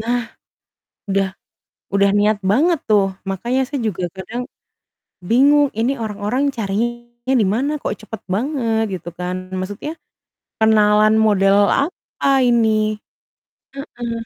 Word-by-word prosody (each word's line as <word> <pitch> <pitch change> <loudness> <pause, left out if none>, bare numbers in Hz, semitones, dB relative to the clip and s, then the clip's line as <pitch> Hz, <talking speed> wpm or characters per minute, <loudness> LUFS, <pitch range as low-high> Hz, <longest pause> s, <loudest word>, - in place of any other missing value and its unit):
Nah, 240 +2 0 0.9
udah 195 0 +1 0.7
udah 200 0 +4
niat 210 0 +3
banget 320 +7 +3
tuh. 205 -2 +4 0.2
Makanya 235 +7 -1
saya 280 -1 -3
juga 185 -3 -3
kadang 225 +7 -5 0.9
bingung, 285 +4 +5
"Ini 240 +4 +2
orang-orang 210 +5 -2
carinya 240 +4 -3
di - - +3
mana 275 +6 0
kok - - -2
cepet 215 0 -8
banget?" 230 -3 0 0.2
Gitu 175 - -8
kan. 180 0 -3 0.2
Maksudnya 205 +10 -5 0.7
kenalan 215 -1 +4
model 195 -1 +4 0.2
apa 290 0 -5 0.2
ini? 235 -2 +3 1.1
Heeh. 245 -4 -6
225 Hz, 115 wpm, -19 LUFS, 205-250 Hz, 1.1 s, bingung